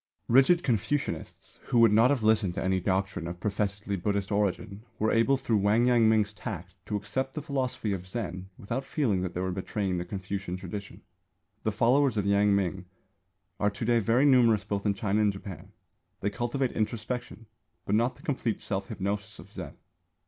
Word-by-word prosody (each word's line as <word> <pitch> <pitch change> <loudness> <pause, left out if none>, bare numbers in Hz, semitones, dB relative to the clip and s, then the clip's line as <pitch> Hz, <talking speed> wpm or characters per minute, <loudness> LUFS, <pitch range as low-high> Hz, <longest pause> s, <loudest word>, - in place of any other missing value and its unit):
Rigid 135 +8 +5
Confucianists, 130 +4 -2
who - - 0
would 115 -2 +7
not 115 +4 +5
have 140 -6 +1
listened 110 -5 +3
to - - -2
any 95 0 +1
doctrine 95 -1 -1
of 85 +1 -6
professedly 100 0 -2
Buddhist 100 +2 -1
origin, 100 0 -1
were 110 0 +1
able 115 +4 +3
through 115 -4 0
Wang 105 +4 +3
Yang 120 -3 +5
ming's 105 -2 +2
tact 95 -5 -6
to 105 - -2
accept 130 +7 -2
the 150 - -3
philosophy 130 -7 -2
of 90 -1 -5
Zen 95 -3 -5
without 120 +7 -3
feeling 125 - 0
that 90 -1 -4
they 90 - -1
were 95 0 -1
betraying 95 0 -2
the - - -2
Confucian 95 -1 -4
tradition. 100 +2 -8 0.6
The 110 - 0
followers 125 +2 +3
of 100 - 0
Yang 100 0 +4
ming 95 -1 -1 0.7
are 105 - +3
to 105 +2 -5
day 120 0 +3
very 115 +6 +3
numerous 120 -7 +5
both 100 +1 -2
in 100 - +2
China 105 +1 0
and 105 -1 +3
Japan. 95 -1 -9 0.5
They 100 - 0
cultivate 120 +4 -1
introspection, 115 -1 -3 0.4
but 100 - -1
not 120 +4 +2
the - - -18
complete 125 -6 -1
self 95 -1 -3
hypnosis 105 +1 -4
of 100 - -13
Zen. 90 -8 -7
105 Hz, 185 wpm, -28 LUFS, 95-115 Hz, 0.7 s, would